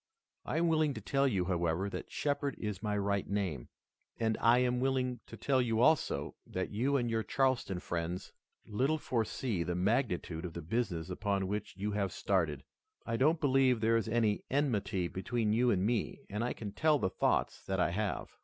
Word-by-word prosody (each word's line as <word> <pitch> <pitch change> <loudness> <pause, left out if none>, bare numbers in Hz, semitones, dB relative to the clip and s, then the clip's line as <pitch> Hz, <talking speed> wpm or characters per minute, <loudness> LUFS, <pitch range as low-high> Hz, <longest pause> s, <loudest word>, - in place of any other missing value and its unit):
I - - -2
am 170 +1 +3
willing 155 -3 +2
to - - -4
tell 140 0 +1
you, 95 -8 +1
however, 85 0 0
that 100 - -6
Shepard 145 -1 -1
is 105 -3 -4
my 105 -1 -1
right 100 -1 0
name, 95 -11 -2 0.5
and 110 -1 +1
I 115 +2 +6
am 125 0 +2
willing 130 -1 0
to - - -10
tell 135 -2 +2
you 115 -2 0
also, 155 +6 +2
that 95 0 -3
you 130 +7 +1
and 120 -2 0
your 115 -1 0
Charleston 130 -7 0
friends 85 0 -4 0.3
little 135 +9 +1
foresee 115 - -1
the 85 +1 -1
magnitude 90 -4 0
of 85 -2 -5
the 85 - -6
business 90 -4 -2
upon 100 -2 -1
which 105 -1 -4
you 105 +2 -2
have 100 -2 -1
started. 80 -10 0 0.4
I 115 - -1
don't 155 +7 +3
believe 135 -4 +3
there 115 +1 +3
is 115 0 +1
any 110 -2 +1
enmity 110 -10 0
between 105 +4 -1
you 120 +2 +3
and 95 -4 +2
me 115 -1 -1
and 105 +3 -1
I 125 - -1
can 105 -3 -6
tell 155 +6 +3
the 95 -8 -1
thoughts - - 0
that 95 -1 -1
I 85 -2 +2
have." 100 -2 -3
110 Hz, 190 wpm, -33 LUFS, 95-125 Hz, 0.5 s, I